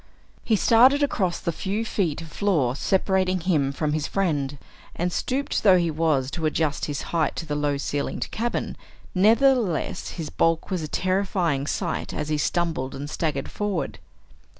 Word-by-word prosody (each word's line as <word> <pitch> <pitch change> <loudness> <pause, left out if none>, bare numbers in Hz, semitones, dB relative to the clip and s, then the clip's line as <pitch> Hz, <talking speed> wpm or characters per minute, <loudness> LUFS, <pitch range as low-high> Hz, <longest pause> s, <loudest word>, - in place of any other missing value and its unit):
He 225 - +2
started 255 +7 +5
across 190 -10 0
the 170 - -2
few 200 +7 -2
feet 170 -8 -1
of 165 - -11
floor 155 -13 +1
separating 185 +2 +1
him 150 -6 +1
from 150 +1 -1
his 155 -1 -1
friend, 145 -8 -1 0.4
and, 175 +1 -1
stooped 275 +2 -1
though 190 -3 +6
he 170 -2 +1
was 150 -4 +1
to 160 -1 -1
adjust 155 -1 0
his 145 -2 -4
height 165 -2 +1
to 165 - -4
the 150 - -3
low 145 -1 0
ceilinged 140 0 -3
cabin, 235 +2 -2 0.4
nevertheless 215 - +2
his 160 -3 -5
bulk 165 +3 +1
was 185 -3 0
a 155 - -4
terrifying 185 -5 0
sight - - -2
as 150 - -3
he 150 -1 0
stumbled 160 -5 -1
and 145 +2 -6
staggered 160 -2 -2
forward. 205 -5 -3
170 Hz, 165 wpm, -24 LUFS, 150-195 Hz, 0.4 s, though